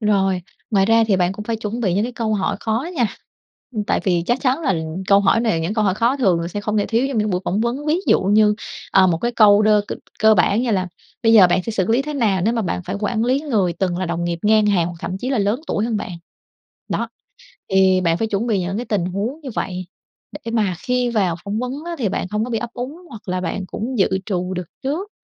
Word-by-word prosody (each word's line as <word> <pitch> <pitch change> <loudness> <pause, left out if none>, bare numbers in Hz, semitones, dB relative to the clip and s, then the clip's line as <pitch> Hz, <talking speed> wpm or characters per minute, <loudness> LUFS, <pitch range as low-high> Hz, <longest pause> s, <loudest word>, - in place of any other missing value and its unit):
Rồi, 195 -4 +1 0.3
ngoài 195 -3 +3
ra 225 0 +4
thì 195 - +4
bạn 180 0 +1
cũng 210 +2 -7
phải 230 +1 -2
chuẩn 220 +2 -4
bị 190 -7 +1
những 205 +3 +1
cái 245 - -4
câu 220 -2 -1
hỏi 195 - -1
khó 225 +5 -1
nha, 240 - +3 0.7
ưm, 210 -1 -1
tại - - 0
vì 175 -3 +2
chắc 245 +2 +1
chắn 265 +3 +1
là 230 - +1 0.3
câu 200 0 +5
hỏi 200 +3 +3
này 220 -9 +1
những 175 +6 -2
câu 215 -2 +1
hỏi 190 - +2
khó 235 +5 +1
thường 190 -11 +2
là 170 - -3
sẽ 205 +3 -4
không 210 +1 -2
thể 205 - +1
thiếu 230 +2 +1
trong 260 - -2
những 210 0 +1
buổi 180 -1 0
phỏng 200 +4 0
vấn. 250 +6 -2
Ví 310 +3 +2
dụ - - +4
như, 210 +2 +4 0.4
ờ, 190 -1 +6
một 170 -3 +1
cái 240 +7 -1
câu 210 -2 +6
đơ 210 -1 +4
c 205 - -7 0.3
cơ 220 0 +6
bản 200 +6 +2
như 245 - 0
là 185 -3 0 0.3
"Bây 225 - +4
giờ 205 -5 +8
bạn 180 +1 +1
sẽ 230 - -4
xử 190 -4 0
lý 235 +4 +3
thế 300 +1 -5
nào 215 -8 +1
nếu 225 +3 +2
mà 230 - 0
bạn 90 - -2
phải - - -3
quản 220 +2 0
lý 260 +3 +2
người 215 - 0
từng 175 0 -1
là 185 - -2
đồng 170 0 -2
nghiệp 170 -1 -2
ngang 215 0 +4
hàng 185 -5 +2
hoặc 175 -1 -6
thậm 185 - -4
chí 255 +6 -3
là 265 - +1
lớn 205 +6 +1
tuổi 210 - -1
hơn 230 -2 -1
bạn?" 190 - -5 0.8
Đó, - - -1 0.6
thì 190 -1 +4
bạn 165 -2 +1
phải 225 - -1
chuẩn 215 +3 -1
bị 205 -4 +1
những 185 +3 -2
cái 245 - -3
tình 205 -5 0
huống 205 - -3
như 275 - -7
vậy, 185 -1 -3 0.6
để 230 - -3
mà 210 -6 +1
khi 250 +3 0
vào 195 -7 +1
phỏng 205 +2 -3
vấn 250 0 -3
á, 345 - -4
thì 220 -7 0
bạn - - -2
không 210 +3 -1
có 250 - -7
bị 225 - -1
ấp - - -5
úng 260 +7 -5
hoặc 220 -5 -10
là 185 0 -1
bạn 185 +2 -3
cũng 240 +6 -4
dự - - +5 0.2
trù 185 -2 -2
được 180 -2 -4 0.2
trước 330 +10 -2
210 Hz, 275 wpm, -20 LUFS, 185-235 Hz, 0.8 s, giờ